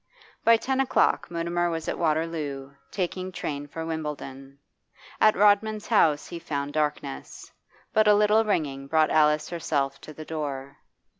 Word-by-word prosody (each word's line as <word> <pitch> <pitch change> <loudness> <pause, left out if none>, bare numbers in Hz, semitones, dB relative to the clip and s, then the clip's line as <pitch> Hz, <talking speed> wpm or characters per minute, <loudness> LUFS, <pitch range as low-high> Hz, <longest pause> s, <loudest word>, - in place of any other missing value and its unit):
By 230 0 +6
ten 265 +4 -2
o'clock 265 -1 +2
Mutimer 170 +1 -1
was 165 -1 -4
at - - -3
Waterloo, 155 -4 -2 0.2
taking 185 0 -3
train 145 -4 -5
for 160 +3 -6
Wimbledon. 140 -4 -6 0.6
At 215 - +5
Rodman's 210 +1 +3
house 160 -10 +3
he 170 - -6
found 145 -3 -4
darkness, 150 - -3 0.4
but 215 0 +4
a 210 - +7
little 210 +2 +4
ringing 145 -10 -2
brought 155 +1 +2
Alice 150 0 +3
herself 145 -5 -2
to - - -10
the 155 +1 -10
door. 140 -4 -5
160 Hz, 145 wpm, -26 LUFS, 145-185 Hz, 0.6 s, a